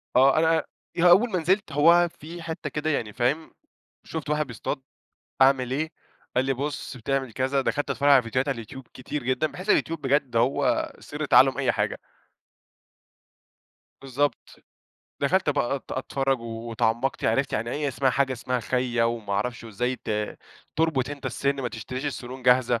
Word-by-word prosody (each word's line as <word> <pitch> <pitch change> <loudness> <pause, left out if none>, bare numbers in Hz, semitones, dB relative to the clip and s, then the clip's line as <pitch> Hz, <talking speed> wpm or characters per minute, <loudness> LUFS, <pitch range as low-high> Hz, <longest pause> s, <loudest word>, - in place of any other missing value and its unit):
آه 135 +3 +6
أنا 160 0 +3 0.3
ي 175 - 0
أول 200 +8 +6
ما 185 - +1
نزلت 185 +2 +1
هو 170 +4 +5
في 170 +3 -8
حتة 165 -1 -5
كده 155 +1 -2
يعني 115 -8 -1
فاهم 140 +8 0 0.5
شُفت 160 -2 -6
واحد 150 -1 0
بيصطاد، 125 +2 -4 0.6
أعمل 130 -2 +4
إيه، 155 +4 -1 0.5
قال 125 - +3
لي 135 - +1
بُص 140 0 -4
بتعمل 135 +1 -2
كذا 135 +3 0
دخلت 145 +1 -1
اتفرج 140 +1 +2
على 135 -3 +7
فيديوهات 130 +4 -1
على 140 - +1
اليوتيوب 130 +2 -9
كتير 135 +3 -5
جدًا. 130 +5 +1
باحس 185 +6 -5
اليوتيوب 165 -1 +2
بجد 135 -3 +1
هو 120 +4 +1
سر - - -5
تعلم - - +5
أي - - +2
حاجة. - - -1 2.0
بالضبط. 135 +2 -2 0.7
دخلت 155 +3 +2
بقى 140 -2 0
أت 135 - -9
أتفرج 135 0 -1
واتعمقت 115 +2 -2
عرفت 135 0 +1
يعني 115 +2 -1
أي 145 +1 -1
اسمها 135 0 +1
حاجة 135 +1 +1
اسمها 125 0 -2
خيَّا، 125 0 0
وما 115 -3 -2
أعرفش 120 +4 -2
وإزاي 120 +4 -2
ت 105 0 -2 0.4
تُربط 155 -5 +1
أنت 145 -1 -6
السن 140 0 0
ما 125 - -2
تشتريش 130 +5 -5
السنون 130 -2 -6
جاهزة. 125 -1 +4
135 Hz, 165 wpm, -25 LUFS, 125-150 Hz, 2.0 s, على